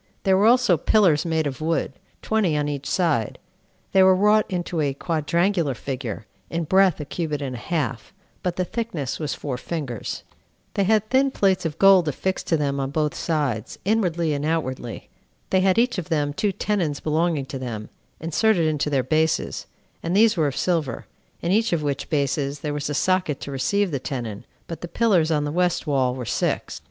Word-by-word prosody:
There 190 -2 +4
were 200 +3 +4
also 245 -7 +5
pillars 175 -3 +3
made 160 -1 +1
of 140 0 -4
wood, 160 -3 0 0.3
twenty 200 -8 +1
on 145 0 0
each 140 -1 -4
side; 155 - 0 0.5
they 190 - +5
were 190 0 +6
wrought 210 +3 +4
into 175 -3 -2
a 140 -2 0
quadrangular 170 0 0
figure, 125 -5 -5 0.2
in 170 0 -2
breadth 190 +1 +3
a 150 - -4
cubit 150 -1 -3
and 135 -3 -4
a - - -6
half, 145 -3 -3 0.3
but 180 -1 -2
the 185 - -1
thickness 220 - -3
was 150 -2 -2
four 135 -4 -4
fingers: 140 -9 -4 0.5
they 200 - +1
had 215 +1 +2
thin 270 +1 +4
plates 195 -8 +1
of 150 - -7
gold 195 -4 +6
affixed 185 +6 -2
to 165 - +2
them 140 -2 -1
on 135 -1 -1
both 150 +1 0
sides, 145 -10 -2
inwardly 175 -7 +1
and 145 0 -2
outwardly: 130 -7 -3 0.4
they 190 - +4
had 190 +1 +3
each 240 -3 +2
of 180 - -7
them 145 -3 0
two 205 +5 0
tenons 175 -7 -1
belonging 155 -2 0
to 135 0 -6
them, 115 -4 -5 0.3
inserted 170 +2 +2
into 150 -1 0
their 135 -3 +1
bases, 155 +5 0 0.3
and 170 +2 -2
these 225 0 +5
were 160 -4 +2
of 140 - -4
silver, 160 -9 -1 0.4
in 170 - 0
each 220 +3 +2
of 160 -3 0
which 140 -2 -2
bases 140 -1 -1
there 150 -1 -2
was 145 0 -3
a 145 - -2
socket 185 -4 +1
to 140 - -7
receive 190 +9 0
the 140 - -1
tenon; 120 -5 -5 0.2
but 165 -2 -7
the 175 - -5
pillars 180 -4 +2
on 150 -2 +1
the 145 - -2
west 175 +1 +1
wall 130 -4 +1
were 125 -2 -5
six. - - -1
160 Hz, 195 wpm, -23 LUFS, 140-185 Hz, 0.5 s, were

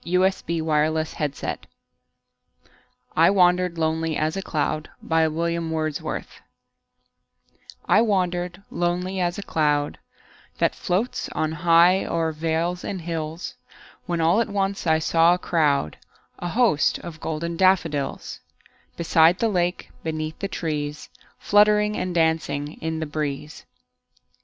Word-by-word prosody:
William 180 -2 0
Wordsworth 155 -1 -1 1.5
I 165 +1 +6
Wandered 180 -2 +3
Lonely 160 0 0
As 155 +2 0
a 195 - -2
Cloud 155 -2 -2 3.0
I 215 - +5
WANDERED 180 -3 -1
lonely 180 +2 -1
as 175 -1 0
a 200 - -5
cloud 150 -4 0 0.6
That - - +2
floats 200 +8 -2
on 155 0 -1
high 170 +3 +4
o'er 165 -1 -1
vales 165 +3 -1
and 190 -3 -4
hills, 165 0 -4 0.5
When 170 -2 -1
all 170 +7 +3
at 230 - -2
once 195 -2 -1
I 160 0 +4
saw 165 +2 +4
a - - -4
crowd, 150 - +1 0.4
A 175 - -3
host, 210 -5 +2
of 165 -2 -9
golden 165 +2 -3
daffodils; 165 -6 +1 0.6
Beside 165 +1 +4
the 230 - +1
lake, 180 -2 -1
beneath 155 0 -4
the 200 - -2
trees, 150 -5 -4 0.3
Fluttering 210 0 +3
and 180 -1 -3
dancing 160 -3 0
in 160 0 -2
the 160 - -2
breeze. 150 0 -5
165 Hz, 115 wpm, -24 LUFS, 155-180 Hz, 3.0 s, I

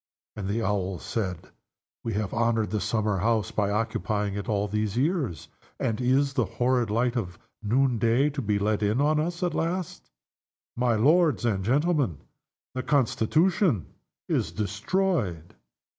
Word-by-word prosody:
And 100 -3 -4
the 110 +3 -1
Owls 95 -3 -1
said, 95 -6 -3 0.6
"Have 105 -3 -2
we - - -2
honored 115 -2 +1
the 105 - 0
summer 105 -1 0
house 110 -1 +1
by 100 -2 0
occupying 105 -1 -1
it 100 +4 -5
all 105 -1 +1
these 105 +1 -2
years 140 - -1 0.3
and 115 +1 -1
is 135 +3 +2
the 125 -4 +1
horrid 125 -2 +2
light 120 +3 +1
of 90 -7 -3 0.2
noonday 120 +3 +2
to 140 -1 -3
be 105 -3 0
let 105 +1 0
in 105 +4 +1
on 150 +2 +3
us 170 +3 -2
at 175 -2 0
last? 170 +2 -3 0.7
My 120 -1 +2
lords 150 +4 +3
and 100 -5 0
gentlemen, 140 - +1 0.6
the 130 - -2
Constitution 140 - +1 0.3
is - - 0
destroyed!" 105 - -1
115 Hz, 145 wpm, -26 LUFS, 105-135 Hz, 0.7 s, on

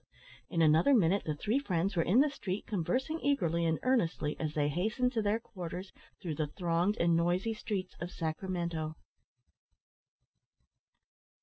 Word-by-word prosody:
In 165 -1 +2
another 160 - +5
minute 195 -2 +3
the 155 - -1
three 220 - 0
friends 195 -6 -1
were 170 - +3
in 195 +10 +4
the 300 - +3
street, 195 -8 -4
conversing 255 - -1
eagerly 170 - +1
and 160 -1 +1
earnestly 175 - +1
as 155 -1 -3
they 145 -1 +2
hastened 220 - 0
to 225 - +1
their 210 +2 +1
quarters 185 -3 -7 0.3
through 170 -5 -4
the 150 0 -1
thronged 175 +6 0
and 170 0 +3
noisy 175 +6 +1
streets 200 -4 -4
of 170 - -3
Sacramento. 165 -2 -3
180 Hz, 145 wpm, -32 LUFS, 165-215 Hz, 0.3 s, another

